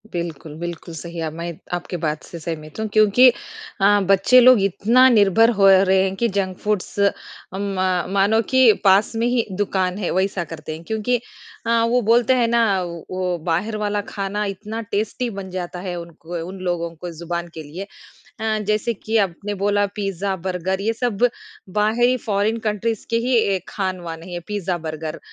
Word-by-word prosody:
बिल्कुल, 165 -3 -5
बिल्कुल, 170 0 -6
सही 170 +1 -8
है 165 - -2
अब 155 - -6
मैं 170 +1 -5 0.2
आपके 175 0 -3
बात 150 -1 -1
से 170 - -9
सहमत 155 +1 -6
हूँ 220 - -1
क्योंकि 215 +4 +6 0.5
अ, 205 +1 +5
बच्चे 195 +6 +6
लोग 255 -1 +7
इतना 230 +7 +4
निर्भर 225 0 +5
हो 195 -1 +6
रहे 190 0 +5
हैं 190 0 -1
कि 235 +4 +1
जंक 185 -2 -1
फूड्स 210 -1 -2
अ, 200 0 +4 0.5
मा 185 -2 0
मानो 200 +3 +2
कि 260 -3 +7
पास 195 +1 +5
में 225 +1 0
ही 245 -2 +1
दुकान 190 -1 -1
है, 200 -4 -2
वैसा 190 -1 0
करते 155 -1 -7
हैं, 160 - -11
क्योंकि 220 +5 0 0.5
अ, 230 0 +3
वो 250 +1 +3
बोलते 235 +3 +3
हैं 245 -2 +2
ना 230 -5 +2
वो 170 -2 -7 0.2
वो 180 -1 0
बाहिर 200 +7 0
वाला 210 -1 -1
खाना 200 +1 -3
इतना 210 +3 -5
टेस्टी 220 +3 -2
बन 195 -3 -7
जाता 180 -1 -5
है, 180 -1 -4
उनको 170 0 -8
उन 190 +1 -8
लोगों 170 -1 -1
को 175 +2 -7
ज़ुबान 170 +1 -4
के 160 - -7
लिए। 155 +6 -7 0.6
अ, 220 -1 0
जैसे 215 +2 0
कि 220 +2 -3
आपने 200 +1 -1
बोला 205 0 +2
पिज़्ज़ा, 195 -1 -2
बर्गर 185 +1 -2
ये 220 +3 0
सब 240 -1 +1 0.5
बाहरी 240 +4 +3
फॉरेन 210 +2 +1
कंट्रीज़ 215 +1 -2
के 230 - +2
ही 255 -1 +3
ए, 195 -3 +2
खान-वान 180 -5 -4
है, 175 0 -6
पिज़्ज़ा, 195 -4 -2
बर्गर। 155 0 -5
195 Hz, 180 wpm, -21 LUFS, 175-220 Hz, 0.6 s, लोग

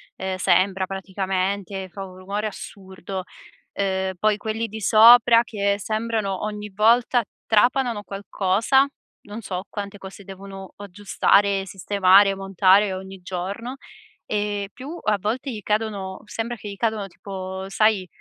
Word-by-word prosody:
ehm, 190 0 -4
sembra 190 +1 +2
praticamente 190 0 -3
fa 195 +2 -7
un 185 -1 -12
rumore 200 +3 -3
assurdo, 190 -2 -8 0.5
uhm, 190 -1 -1
poi 215 +2 +2
quelli 220 +2 -3
di 220 +1 -7
sopra 230 +2 +7
che 200 -3 0
sembrano 215 -2 -2
ogni 210 -1 -6
volta 235 +4 +3 0.2
trapanano 235 0 +2
qualcosa, 205 +7 +1 0.4
non 210 +2 -8
so 185 -2 -5
quante 205 -1 -6
cose 195 +1 -11
devono 195 0 -10
aggiustare, 200 0 +1
sistemare, 195 +1 +4
montare 195 +1 +3
ogni 190 0 -8
giorno. 195 +8 -5 0.5
Ehm, 205 -1 -2
più 285 +6 -8
a 215 -1 +2
volte 245 +7 -2
gli 215 -3 -6
cadono 205 -2 -2
sembra 225 +2 -4
che 210 -2 -9
gli 200 - -8
cadono 220 -3 -1
tipo, 190 0 -7
sai, 200 -1 +2
200 Hz, 130 wpm, -23 LUFS, 190-215 Hz, 0.5 s, sopra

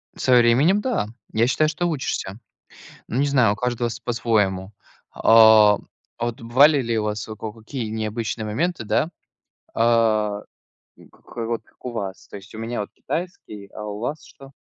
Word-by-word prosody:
Со 130 - +2
временем 135 - +4
да. 230 - -1 0.2
Я 115 +2 +2
считаю, 155 +4 +2
что 175 +3 -1
учишься. 130 - -3 0.7
Ну 120 - -2
не 145 - +2
знаю, 125 -7 +3
у - - -4
каждого 120 -1 -1
св 115 +2 -8
по-своему. 105 -5 0 0.4
А, 110 -2 +6 0.4
а 120 - -2
вот 120 -1 -4
бывали 135 +5 +4
ли 115 -2 -1
у 105 - -1
вас 105 0 -3
во 110 - -7
коко 110 0 -8
какие 115 +1 -5
необычные 110 0 -3
моменты, 150 +7 -2
да, 110 +10 0 0.6
а, 110 -3 +2 0.5
к - - -19
к - - -17
вот 115 0 -3
как - - -30
у 125 - -3
вас? 100 -4 -6
То - - -9
есть 100 +2 -13
у - - -8
меня 115 +1 -4
вот 105 - -5
китайский, 160 - -6
а 105 - -7
у 105 -1 -5
вас 145 +8 -4
что? 135 -2 -15
115 Hz, 180 wpm, -22 LUFS, 105-130 Hz, 0.7 s, А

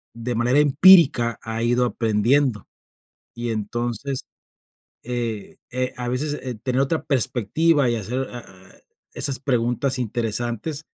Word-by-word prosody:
de 120 +1 -3
manera 120 +5 +3
empírica 145 - +5
ha 115 0 -4
ido 120 +1 +2
aprendiendo. 115 +2 +1 0.7
Y 120 0 -4
entonces, 120 +4 -3 0.8
eh 115 -4 -4
eh, 130 0 -1
a 125 -1 -4
veces, 145 +4 -2
eh, 125 -2 -4
tener 130 +1 0
otra 145 +4 -1
perspectiva 135 +2 +1
y 120 - 0
hacer, 125 +5 -3
ah 120 -1 -7
ah, 95 -1 -17 0.4
esas 135 -2 -1
preguntas 125 0 0
interesantes 120 +4 -3
120 Hz, 125 wpm, -22 LUFS, 115-135 Hz, 0.8 s, empírica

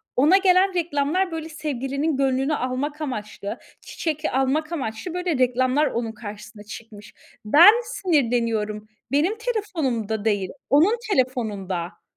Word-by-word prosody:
ona 305 +9 +5
gelen 380 0 +4
reklamlar 335 +2 0
böyle 320 0 -5
sevgilinin 290 -1 -2
gönlünü 270 +2 +1
almak 280 +4 -3
amaçlı, 210 -7 -5 0.2
çiçek 310 -2 -4
almak 270 +4 0
amaçlı 275 +1 -4
böyle 360 -4 -1
reklamlar 255 +3 +2
onun 230 -1 -2
karşısına 210 -1 -10
çıkmış. 210 -1 -11 0.3
Ben 320 - +9
sinirleniyorum, 230 - 0 0.2
benim 325 +10 +1
telefonumda 300 - -2
değil, 205 -4 0 0.2
onun 340 - +4
telefonunda. 205 - -2
270 Hz, 115 wpm, -23 LUFS, 225-320 Hz, 0.3 s, Ben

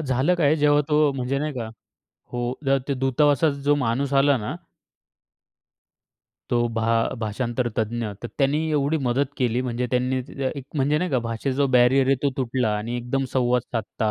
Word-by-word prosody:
झालं 135 +4 +1
काय 155 -4 +3
जेव्हा 145 -1 +4
तो 150 -1 +3
म्हणजे 130 +1 -2
नाही 150 +1 -2
का 120 -4 -4 0.7
हो, 120 0 -2
जेव्हा 135 0 +3
ते 140 - 0
दूतावासाचा 140 +2 +2
जो 145 +1 +3
माणूस 135 +1 -1
आला 140 -1 +3
ना 120 +8 -4 2.0
तो 120 0 +2
भा 115 0 +1
भाषांतर 120 +3 -2
तज्ञ, 115 +1 -1 0.2
तर 120 - -4
त्यांनी 140 +2 +2
एवढी 145 +1 +1
मदत 130 +3 +1
केली 125 -2 0
म्हणजे 125 0 -2
त्यांनी 130 +1 0
ते - - -14
त्या 135 -1 0
एक 135 - -8
म्हणजे 145 +2 +2
नाही 180 +2 -2
का 130 - +2
भाषेचा 115 +3 -3
जो 140 0 +3
बॅरियर 130 +2 +4
आहे 135 - +4
तो 140 - +2
तुटला 125 -4 0
आणि 115 +3 -4
एकदम 125 +3 -2
संवाद 125 -1 +2
साधता 110 -1 -2
130 Hz, 180 wpm, -24 LUFS, 120-140 Hz, 2.0 s, जेव्हा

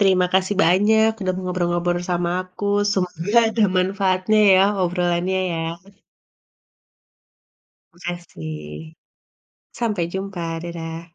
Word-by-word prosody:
Terima 185 -2 +4
kasih 190 +2 +2
banyak 215 +5 +4
udah 185 -1 0
ngobrol-ngobrol 175 -1 -1
sama 175 0 0
aku 185 +2 -9 0.3
semoga 180 +3 0
ada 220 -1 +2
manfaatnya 190 +2 +1 0.2
ya 185 - +5 0.2
obrolannya 175 +1 0
ya. 165 - -2 2.3
Makasih. 80 - -8 0.8
Sampai 210 -7 -1
jumpa 190 -2 -5 0.2
dadah! 165 -1 -6
180 Hz, 90 wpm, -21 LUFS, 170-195 Hz, 2.3 s, ya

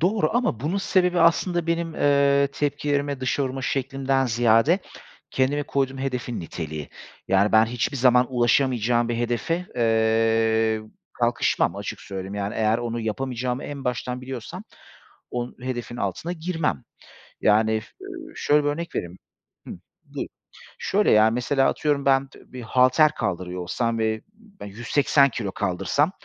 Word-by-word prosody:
Doğru 180 -1 +2
ama 240 - 0
bunun 155 +8 -1
sebebi 180 -2 +2
aslında 170 +1 +2
benim, 170 -1 -1
eee, 140 -1 +3
tepkilerimi 145 -1 -1
dışa 130 +2 0
vurma 130 0 -4
şeklimden 135 0 0
ziyade 120 - +3 0.5
kendime 135 +3 +1
koyduğum 135 -1 -1
hedefin 125 -3 -3
niteliği. 80 -3 -6 0.4
Yani, 100 +2 +3
ben 110 0 +6
hiçbir 120 +4 -2
zaman 125 -1 +4
ulaşamayacağım 120 -1 +2
bir 120 - -1
hedefe, 120 +9 -1
eee, 115 -1 +2 0.3
kalkışmam - - +1
açık - - -6
söyleyeyim. 95 0 -6
Yani, 100 0 -3
eğer 110 +1 +2
onu 120 -1 -3
yapamayacağımı 125 +3 -3
en 140 -2 -7
baştan 125 0 -2
biliyorsam 130 - -7 0.7
on 120 0 -4
hedefin 120 -1 -4
altına 110 - -3
girmem. 165 -6 -2 0.6
Yani, 110 +1 +3
f - - -15
ııı, 350 -5 -9
şöyle 150 0 +2
bir 145 - +1
örnek 165 +3 -4
vereyim 85 +1 -4 0.5
Hıh, - - -6 0.3
buyur. - - -5 0.5
Şöyle, 205 +2 +1
ya, 110 +1 +5
mesela, 135 +3 +1
atıyorum, 145 -3 0
ben 135 0 +3
t 135 - -17
bir 125 - -7
halter 130 +6 +4
kaldırıyor 90 0 -3
olsam 115 +6 -1
ve 110 0 0 0.4
180 135 +6 +2
kilo 110 -5 -4
kaldırsam 100 - 0
125 Hz, 140 wpm, -24 LUFS, 110-145 Hz, 0.7 s, ben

